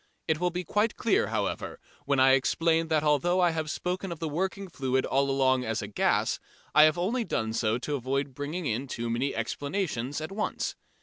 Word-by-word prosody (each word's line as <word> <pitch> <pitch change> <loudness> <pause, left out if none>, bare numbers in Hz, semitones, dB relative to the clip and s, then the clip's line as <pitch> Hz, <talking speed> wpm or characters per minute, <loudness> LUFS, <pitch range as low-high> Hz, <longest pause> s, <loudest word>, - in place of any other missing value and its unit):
It 160 -2 +1
will 180 0 +2
be 180 +1 -3
quite 210 +6 +1
clear, 215 - +2
however, 105 -2 -3 0.3
when 140 -1 +2
I 130 0 +6
explain 165 +5 +2
that 155 -2 +1
although 155 +5 +2
I 175 -2 +4
have 160 -1 -3
spoken 180 +3 -3
of 170 - -4
the 160 - -3
working 190 +5 -2
fluid 130 -6 -1
all 140 +1 +1
along 130 -1 +2
as 110 -3 -2
gas, - - +1 0.3
I 150 - +8
have 155 +2 +3
only 225 +8 0
done 110 - -2
so 110 0 +1
to 145 +4 -4
avoid 135 +1 -2
bringing 150 +6 -4
in 125 +2 -1
too 120 -2 -3
many 130 +4 -1
explanations 140 - -2
at 155 +4 -5
once. 210 +2 -2
150 Hz, 195 wpm, -28 LUFS, 130-175 Hz, 0.3 s, I